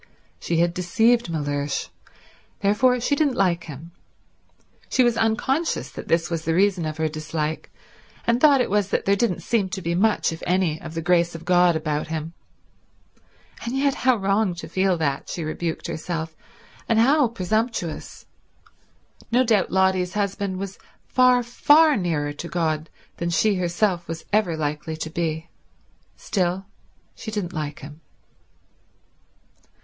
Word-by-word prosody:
She 170 Hz, -, -1 dB
had 170 Hz, +1 st, +2 dB
deceived 225 Hz, +6 st, +2 dB
Mellersh; 145 Hz, -3 st, -2 dB, 0.7 s
therefore 235 Hz, +5 st, +3 dB
she 265 Hz, +4 st, +1 dB
didn't 285 Hz, -3 st, +1 dB
like 175 Hz, -3 st, +1 dB
him. 160 Hz, +2 st, -9 dB, 1.0 s
She 255 Hz, -, +3 dB
was 240 Hz, -1 st, +3 dB
unconscious 240 Hz, +8 st, 0 dB
that -, -, -9 dB
this 165 Hz, 0 st, +2 dB
was 165 Hz, -2 st, -3 dB
the 165 Hz, 0 st, 0 dB
reason 185 Hz, -3 st, +2 dB
of 155 Hz, 0 st, -5 dB
her 160 Hz, 0 st, +1 dB
dislike, 155 Hz, 0 st, -4 dB, 0.6 s
and 235 Hz, +1 st, +2 dB
thought 285 Hz, -4 st, +6 dB
it 240 Hz, -, -1 dB
was 205 Hz, -1 st, +1 dB
that -, -, -1 dB
there 200 Hz, -, +4 dB
didn't 200 Hz, -4 st, -1 dB
seem 210 Hz, -5 st, 0 dB
to 190 Hz, -, -4 dB
be 170 Hz, -2 st, -2 dB
much, 205 Hz, +1 st, +2 dB
if 160 Hz, -, -9 dB
any, 180 Hz, -4 st, +1 dB
of 160 Hz, 0 st, -8 dB
the 165 Hz, -, -3 dB
grace 170 Hz, 0 st, +2 dB
of 165 Hz, -, -9 dB
god 180 Hz, -1 st, +4 dB
about 155 Hz, -1 st, -2 dB
him. 160 Hz, +1 st, -4 dB, 1.3 s
And 240 Hz, +3 st, -3 dB
yet 275 Hz, 0 st, +2 dB
how 255 Hz, -1 st, +2 dB
wrong 195 Hz, -2 st, +1 dB
to 170 Hz, -, -8 dB
feel 190 Hz, -1 st, +1 dB
that, 140 Hz, -4 st, -2 dB
she 170 Hz, -, -4 dB
rebuked 160 Hz, +1 st, -3 dB
herself, 160 Hz, 0 st, -4 dB, 0.5 s
and 230 Hz, -, +3 dB
how 270 Hz, +4 st, +5 dB
presumptuous. 215 Hz, -4 st, -3 dB, 1.1 s
No 250 Hz, +2 st, +4 dB
doubt 220 Hz, -5 st, +2 dB
Lotty's 190 Hz, -1 st, +1 dB
husband 200 Hz, -2 st, -1 dB
was 195 Hz, 0 st, -6 dB, 0.3 s
far, 250 Hz, -1 st, +4 dB
far 295 Hz, +6 st, +5 dB
nearer 155 Hz, -6 st, -1 dB
to 160 Hz, +4 st, -7 dB
God 160 Hz, -2 st, -1 dB, 0.3 s
than 170 Hz, -, -2 dB
she 210 Hz, +5 st, +2 dB
herself 175 Hz, 0 st, 0 dB
was 165 Hz, -1 st, -6 dB
ever 205 Hz, -6 st, +2 dB
likely 150 Hz, +1 st, -3 dB
to 160 Hz, 0 st, -5 dB
be. 160 Hz, -1 st, -3 dB, 0.6 s
Still, 185 Hz, 0 st, -1 dB, 0.5 s
she 220 Hz, -, -8 dB
didn't 205 Hz, -5 st, -3 dB
like 150 Hz, -2 st, -4 dB
him. 150 Hz, +3 st, -11 dB
180 Hz, 155 wpm, -23 LUFS, 160-220 Hz, 1.3 s, thought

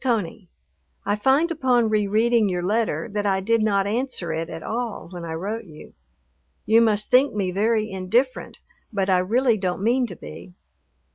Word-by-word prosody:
CONEY, 210 Hz, -7 st, -2 dB, 0.6 s
I 205 Hz, -, +1 dB
find 270 Hz, +10 st, +2 dB
upon 255 Hz, -7 st, +2 dB
re 210 Hz, -1 st, +1 dB
reading 220 Hz, +1 st, +2 dB
your 180 Hz, -1 st, -2 dB
letter 220 Hz, +4 st, 0 dB
that 205 Hz, 0 st, -1 dB
I 190 Hz, -1 st, +1 dB
did 230 Hz, +4 st, +1 dB
not 200 Hz, -2 st, +2 dB
answer 215 Hz, -6 st, -2 dB
it 165 Hz, +1 st, -3 dB
at 165 Hz, -, -7 dB
all 230 Hz, -6 st, -4 dB
when 175 Hz, -2 st, -7 dB
I 165 Hz, -1 st, -5 dB
wrote 205 Hz, +8 st, -4 dB
you. 155 Hz, -4 st, -14 dB, 0.7 s
You 225 Hz, +1 st, +5 dB
must 215 Hz, -2 st, +1 dB
think 255 Hz, 0 st, +4 dB
me 190 Hz, -3 st, -1 dB
very 215 Hz, +3 st, +1 dB
indifferent, 220 Hz, +7 st, -1 dB, 0.3 s
but 195 Hz, -3 st, 0 dB
I 185 Hz, -, +4 dB
really 230 Hz, +5 st, +2 dB
don't 190 Hz, 0 st, -3 dB
mean 245 Hz, +3 st, +2 dB
to -, -, -9 dB
be. 180 Hz, -, -11 dB
210 Hz, 180 wpm, -23 LUFS, 190-235 Hz, 0.7 s, You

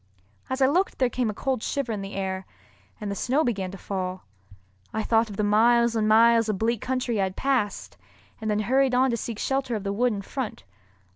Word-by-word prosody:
As 260 Hz, +1 st, +1 dB
I -, -, +7 dB
looked 350 Hz, +8 st, +1 dB
there 255 Hz, -2 st, +1 dB
came 245 Hz, -2 st, 0 dB
a -, -, -2 dB
cold 265 Hz, -1 st, -1 dB
shiver 275 Hz, -2 st, -2 dB
in 210 Hz, -2 st, -3 dB
the 195 Hz, +1 st, -7 dB
air, 190 Hz, -1 st, -3 dB, 0.5 s
and 210 Hz, -2 st, -4 dB
the -, -, -3 dB
snow 265 Hz, +9 st, +1 dB
began 200 Hz, -8 st, -1 dB
to 195 Hz, -, -8 dB
fall. 185 Hz, -1 st, -4 dB, 0.7 s
I 220 Hz, -, -2 dB
thought 225 Hz, 0 st, +2 dB
of 200 Hz, -, -8 dB
the 210 Hz, -, 0 dB
miles 230 Hz, +3 st, +4 dB
and 215 Hz, -1 st, +1 dB
miles 230 Hz, +1 st, +5 dB
of 210 Hz, -, 0 dB
bleak 225 Hz, +2 st, 0 dB
country 250 Hz, -4 st, -1 dB
I -, -, +3 dB
had 190 Hz, 0 st, -5 dB
passed, 255 Hz, -7 st, -1 dB, 0.4 s
and 220 Hz, -, -2 dB
then 210 Hz, 0 st, +1 dB
hurried 260 Hz, +3 st, +2 dB
on 260 Hz, +1 st, +3 dB
to 235 Hz, -, 0 dB
seek 230 Hz, -1 st, -5 dB
shelter 265 Hz, 0 st, -1 dB
of 210 Hz, -, -4 dB
the 200 Hz, 0 st, -2 dB
wood 245 Hz, +4 st, +2 dB
in 200 Hz, -2 st, -4 dB
front. 255 Hz, +1 st, -5 dB
225 Hz, 225 wpm, -25 LUFS, 205-255 Hz, 0.7 s, I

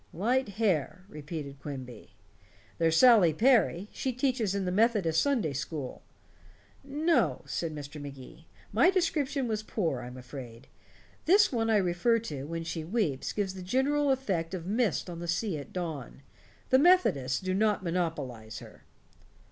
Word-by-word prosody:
"Light 240 Hz, +7 st, 0 dB
hair," 185 Hz, -4 st, 0 dB
repeated 150 Hz, -5 st, -7 dB
Quimby. 130 Hz, -8 st, -9 dB, 0.6 s
"There's 165 Hz, -1 st, +3 dB
Sally 215 Hz, -9 st, +7 dB
Perry. 210 Hz, -, +3 dB
She 260 Hz, -, -2 dB
teaches 245 Hz, -6 st, 0 dB
in 195 Hz, -1 st, -1 dB
the 180 Hz, -, -1 dB
Methodist 200 Hz, -6 st, +2 dB
Sunday 240 Hz, -, +1 dB
school." 140 Hz, -1 st, -5 dB, 0.8 s
"No," 275 Hz, -, +1 dB
said 150 Hz, +4 st, -3 dB
Mr. 145 Hz, 0 st, -8 dB
Magee. 140 Hz, +3 st, -11 dB, 0.3 s
"My 240 Hz, -, +5 dB
description 305 Hz, -8 st, 0 dB
was 215 Hz, -2 st, -1 dB
poor, 175 Hz, -, -2 dB
I'm 125 Hz, +1 st, -8 dB
afraid. 125 Hz, -1 st, -10 dB, 0.6 s
This 405 Hz, +6 st, +5 dB
one 225 Hz, -3 st, 0 dB
I 220 Hz, -, +4 dB
refer 190 Hz, +5 st, +2 dB
to, 150 Hz, -12 st, -5 dB
when 165 Hz, +1 st, -4 dB
she 165 Hz, -1 st, -4 dB
weeps, 165 Hz, -, -1 dB
gives 200 Hz, -3 st, -2 dB
the 190 Hz, -, -8 dB
general 275 Hz, +9 st, +1 dB
effect 190 Hz, -10 st, -1 dB
of 170 Hz, -3 st, -6 dB
mist 215 Hz, +2 st, 0 dB
on 170 Hz, -2 st, -7 dB
the 175 Hz, -, -5 dB
sea 175 Hz, +2 st, -1 dB
at 140 Hz, -, -10 dB
dawn. 155 Hz, -7 st, -5 dB, 0.5 s
The 260 Hz, -, +6 dB
Methodists 220 Hz, -, +3 dB
do 185 Hz, -1 st, -2 dB
not 210 Hz, 0 st, +1 dB
monopolize 150 Hz, -, -3 dB
her." -, -, -12 dB
180 Hz, 150 wpm, -29 LUFS, 150-235 Hz, 0.8 s, Sally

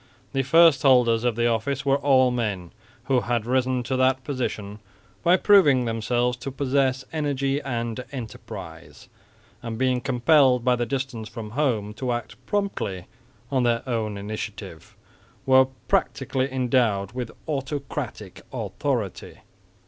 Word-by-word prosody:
The 135 Hz, -, +1 dB
first 160 Hz, 0 st, +5 dB
holders 125 Hz, -4 st, +4 dB
of 120 Hz, -2 st, +1 dB
the 120 Hz, +1 st, +1 dB
office 120 Hz, +4 st, -1 dB
were 135 Hz, 0 st, +3 dB
all 130 Hz, -2 st, +4 dB
men 105 Hz, -8 st, -3 dB, 0.3 s
who 130 Hz, 0 st, +2 dB
had 120 Hz, -2 st, -1 dB
risen 130 Hz, 0 st, +1 dB
to 130 Hz, +2 st, -2 dB
that 130 Hz, 0 st, +2 dB
position 110 Hz, -7 st, -4 dB, 0.4 s
by 175 Hz, +2 st, +4 dB
proving 150 Hz, -, +5 dB
themselves 120 Hz, +2 st, 0 dB
to 135 Hz, -, -6 dB
possess 135 Hz, -1 st, 0 dB
energy 140 Hz, -2 st, -1 dB
and 120 Hz, -2 st, -3 dB
enterprise, 90 Hz, -, -9 dB, 0.5 s
and 115 Hz, -2 st, -5 dB
being 130 Hz, 0 st, +1 dB
compelled 130 Hz, -1 st, +3 dB
by 125 Hz, -1 st, +4 dB
the 120 Hz, -1 st, -2 dB
distance 130 Hz, -4 st, -4 dB
from 110 Hz, -3 st, -8 dB
home 115 Hz, -6 st, 0 dB
to 125 Hz, +2 st, -2 dB
act 120 Hz, 0 st, -5 dB
promptly 150 Hz, -, -2 dB, 0.5 s
on 130 Hz, -2 st, +2 dB
their 120 Hz, 0 st, 0 dB
own 110 Hz, -4 st, -2 dB
initiative, 105 Hz, +2 st, -7 dB, 0.5 s
were 130 Hz, -1 st, +6 dB, 0.2 s
practically 130 Hz, -1 st, 0 dB
endowed 120 Hz, -6 st, +1 dB
with 125 Hz, -1 st, -5 dB, 0.2 s
autocratic 140 Hz, -2 st, -5 dB
authority. -, -, -3 dB
125 Hz, 135 wpm, -24 LUFS, 115-135 Hz, 0.5 s, were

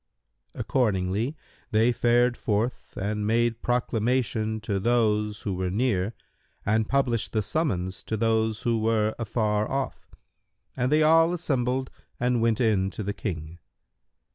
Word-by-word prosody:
Accordingly 105 Hz, +2 st, 0 dB, 0.3 s
they 110 Hz, +3 st, +3 dB
fared 120 Hz, +1 st, +3 dB
forth 115 Hz, +3 st, -2 dB
and 105 Hz, +1 st, -2 dB
made 115 Hz, +1 st, +1 dB
proclamation 115 Hz, -2 st, 0 dB
to 100 Hz, -1 st, -1 dB
those 105 Hz, -2 st, +1 dB
who 100 Hz, -, -2 dB
were 90 Hz, 0 st, -2 dB
near 105 Hz, -1 st, 0 dB, 0.5 s
and 110 Hz, +1 st, +1 dB
published 125 Hz, -5 st, +1 dB
the 110 Hz, -1 st, +1 dB
summons 95 Hz, -, -1 dB
to 110 Hz, -, -2 dB
those 110 Hz, +1 st, +1 dB
who 115 Hz, -3 st, +1 dB
were 110 Hz, -1 st, +1 dB
afar 110 Hz, -2 st, 0 dB
off, 135 Hz, 0 st, -3 dB, 0.7 s
and 125 Hz, +1 st, 0 dB
they 155 Hz, +1 st, +4 dB
all 165 Hz, +2 st, +5 dB
assembled 130 Hz, -6 st, -1 dB, 0.3 s
and 125 Hz, -1 st, +1 dB
went 115 Hz, -1 st, +2 dB
in 105 Hz, -6 st, +2 dB
to 105 Hz, -, -6 dB
the 100 Hz, +1 st, -2 dB
King. 85 Hz, -5 st, -5 dB
110 Hz, 135 wpm, -26 LUFS, 105-125 Hz, 0.7 s, all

